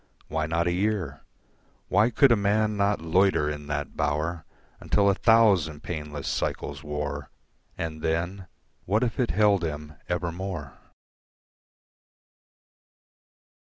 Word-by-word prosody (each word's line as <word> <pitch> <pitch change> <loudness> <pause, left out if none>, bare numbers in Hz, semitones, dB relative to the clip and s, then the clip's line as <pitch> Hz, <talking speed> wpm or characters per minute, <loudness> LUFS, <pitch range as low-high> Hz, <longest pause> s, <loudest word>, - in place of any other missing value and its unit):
Why 80 0 -1
not 85 +1 0
a 90 - +1
year, 95 -6 -1 0.7
Why 105 +5 +4
could 130 +3 +5
a - - +7
man 105 +1 +1
not 100 -2 +1
loiter 85 -2 +3
in 75 -1 -7
that 75 0 -3
bower 80 +2 -1 0.3
Until 100 -1 +3
a - - +2
thousand 95 -9 +3
painless 75 -4 -5
cycles 70 -1 -3
wore, 75 -1 -4 0.5
And 80 -1 -4
then 85 +4 -2 0.4
what 105 +6 +2
if 120 0 -2
it 125 - +2
held 105 -3 +3
him 75 -1 -4 0.2
evermore? 90 -4 -3
85 Hz, 120 wpm, -26 LUFS, 75-100 Hz, 0.7 s, a